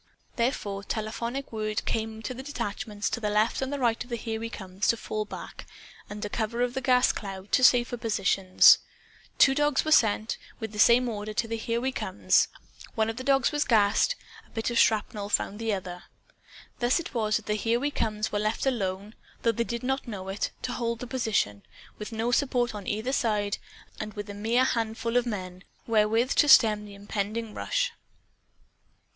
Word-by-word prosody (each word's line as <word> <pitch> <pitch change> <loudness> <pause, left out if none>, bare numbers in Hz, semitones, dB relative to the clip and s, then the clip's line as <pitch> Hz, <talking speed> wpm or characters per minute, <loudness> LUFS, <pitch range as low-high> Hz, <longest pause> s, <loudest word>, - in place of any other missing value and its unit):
Therefore 215 -5 -1
telephonic 235 +5 -4
word 215 -1 -2
came 220 0 -3
to 255 - -3
the 255 - -7
detachments 215 -6 -4
to 235 - -3
left 210 +3 +1
and 265 +1 -2
right 235 -3 +1
of 245 - -18
the 240 - -2
Here 225 -1 -4
We 230 0 -4
Comes, 190 -2 -4
to 230 - +3
fall 215 -1 -3
back, - - -9 0.4
under 210 0 -5
cover 225 +2 -2
of 245 0 -1
the 265 - -2
gas 250 0 +4
cloud, 195 -1 -7
to 255 - +3
safer 245 -1 +5
positions. 195 -4 +5 0.6
Two 270 - +6
dogs 295 0 +1
were 310 - -1
sent, 220 -5 +3 0.2
with 220 -3 -5
the 210 - -8
same 245 +3 +6
order, 215 -2 -5
to 235 0 0
the 230 - -2
Here 230 +1 -2
We 260 +2 -1
Comes. - - +2 0.5
(One 220 -1 +1
of 225 - -12
the 255 - -5
dogs 270 -1 +3
was 295 0 +1
gassed. 220 - +3 0.3
A - - -26
bit 225 +1 -2
of 235 - +2
shrapnel 210 -2 +1
found 205 0 0
the 225 -1 -1
other.) 180 -3 -5 0.7
Thus 245 +6 +2
it 340 - -7
was 215 -3 +1
that 220 - -2
the 210 - 0
Here 225 +2 +1
We 290 +3 -1
Comes 215 -4 -2
were 205 - 0
left 215 +4 -1
alone 205 -5 -2 0.3
(though 230 - +4
they 235 +1 -1
did 235 0 -4
not 265 +1 -1
know 190 -4 -6
it), 195 +2 -2
to 250 - -2
hold 235 -1 -2
the 250 - -6
position, 220 - -1 0.4
with 210 +2 -6
no 225 +2 -1
support 245 -3 +1
on 205 -2 -7
either 220 +5 -2
side, 210 -5 0 0.4
and 215 0 -5
with 205 -1 -6
a - - -7
mere 225 +5 +2
handful 230 -1 -1
of 245 0 +3
men 185 -4 -5 0.2
wherewith 225 +3 +2
to 295 - +5
stem 210 -5 +6
the 200 -1 -11
impending 210 +2 -4
rush. - - -1
225 Hz, 195 wpm, -27 LUFS, 210-245 Hz, 0.7 s, Two